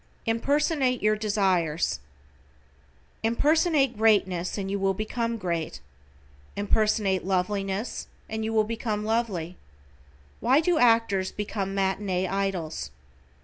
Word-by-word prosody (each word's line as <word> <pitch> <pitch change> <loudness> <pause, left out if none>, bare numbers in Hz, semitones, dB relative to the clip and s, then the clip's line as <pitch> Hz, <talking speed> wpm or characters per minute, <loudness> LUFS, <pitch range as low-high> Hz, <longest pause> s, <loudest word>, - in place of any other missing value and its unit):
=IMPERSONATE 265 +2 +1
YOUR 215 0 +4
DESIRES:= 185 - +1 1.2
Impersonate 285 +3 +2
greatness 195 -5 +2
and 195 -1 -3
you 200 - -1
will 195 0 +1
become 230 +3 -2
great. 170 -5 -3 0.8
Impersonate 205 -2 +1
loveliness 195 +3 -2 0.2
and 220 0 -3
you 220 - -2
will 220 -1 +3
become 215 -1 -3
lovely. 205 -7 -1 0.8
Why 265 +4 +4
do 330 0 +2
actors 225 -5 +3
become 200 -2 -3
matinee 190 -1 0
idols? 180 - -2
210 Hz, 105 wpm, -26 LUFS, 190-230 Hz, 1.2 s, YOUR